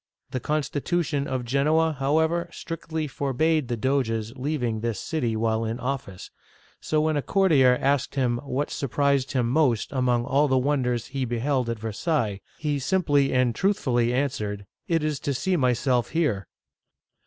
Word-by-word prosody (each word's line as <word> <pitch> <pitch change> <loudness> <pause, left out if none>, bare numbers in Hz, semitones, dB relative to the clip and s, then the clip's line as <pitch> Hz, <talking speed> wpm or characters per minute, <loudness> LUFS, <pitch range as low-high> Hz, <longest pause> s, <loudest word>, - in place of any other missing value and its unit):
The 130 - -2
constitution 150 +1 -1
of 130 -2 -2
Genoa, 155 +5 +2
however, 160 +5 +1
strictly 165 -2 -5
forbade 145 +2 0
the 120 - -2
Doge's 115 -2 -1
leaving 130 -5 -2
this 115 -2 -2
city 125 -9 -2
while 110 0 0
in 115 +2 -3
office, 125 -8 -5 0.5
so 155 - 0
when 155 -1 +1
a - - +1
courtier 140 -10 +4
asked 140 -1 0
him 125 -3 +1
what 140 +2 -3
surprised 140 0 0
him 125 -3 +1
most 125 -4 +1
among 125 -3 +1
all 145 +4 +3
the 130 -1 +2
wonders 125 -3 0
he 135 -1 -1
beheld 125 +1 0
at 115 - -2
Versailles, 110 - -1 0.2
he 150 -2 -1
simply 145 -2 +2
and 125 -2 +2
truthfully 125 - +1
answered, 110 -7 -2
" - - -53
It 165 -2 +1
is 150 -3 -1
to 140 - -2
see 185 +8 0
myself 125 -3 +1
here 135 - 0
135 Hz, 155 wpm, -25 LUFS, 120-150 Hz, 0.5 s, courtier